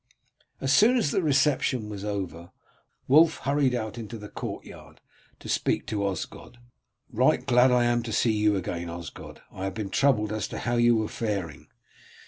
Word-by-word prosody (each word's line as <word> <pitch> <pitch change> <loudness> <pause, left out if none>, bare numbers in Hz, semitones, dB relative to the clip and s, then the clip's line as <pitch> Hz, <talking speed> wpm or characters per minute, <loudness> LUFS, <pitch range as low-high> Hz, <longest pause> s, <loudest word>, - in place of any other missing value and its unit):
As 135 0 +1
soon 230 - +5
as 180 -12 +1
the - - +1
reception 140 -6 +1
was 100 -2 -7
over 95 -5 -5 0.6
Wulf 160 +4 +5
hurried 140 -2 +1
out 110 -1 -4
into 115 0 -7
the 105 -1 -10
courtyard - - -8 0.4
to - - -12
speak - - 0
to 105 -2 -2
Osgod. 100 +5 -6 0.6
"Right - - +2
glad 125 +1 +5
am 120 -1 +3
I - - -2
to 115 -1 -6
see 115 +2 +2
you 105 -1 +2
again, 85 -2 -4
Osgod; 85 -1 -9
I 95 - -6
have 95 - -4
been 105 -3 -4
troubled 110 -6 +2
as 110 -2 -2
to - - -7
how 120 0 -1
you 120 0 +4
were 110 -1 0
faring." 100 -12 -4
110 Hz, 175 wpm, -26 LUFS, 100-130 Hz, 0.6 s, soon